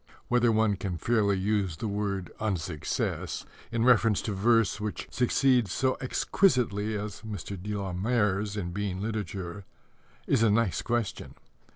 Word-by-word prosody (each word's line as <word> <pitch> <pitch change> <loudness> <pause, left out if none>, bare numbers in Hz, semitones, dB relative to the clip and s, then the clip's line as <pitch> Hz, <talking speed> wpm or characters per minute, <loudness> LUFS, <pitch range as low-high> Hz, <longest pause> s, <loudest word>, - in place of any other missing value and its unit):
Whether 120 -1 +4
one 110 -2 +2
can 90 -3 -3
fairly 100 +1 +2
use 95 -3 0
the 110 - -3
word 100 -3 -2
"unsuccess" 90 -8 -2 0.3
in 115 0 +1
reference 115 -4 +4
to 110 - -2
verse 110 +1 +2
which 105 -1 -4
succeeds 125 -3 +2
so 130 +4 +1
exquisitely 120 - +1
as 105 -1 -6
Mr. 100 -2 -6
de 105 +2 -3
la 100 -2 -3
Mare's 105 0 0
in 90 -4 -3
being 95 0 -3
literature 100 -3 -4 0.6
is - - +2
a 115 - +5
nice 105 -2 +2
question. 120 -3 -2
105 Hz, 145 wpm, -28 LUFS, 95-115 Hz, 0.6 s, a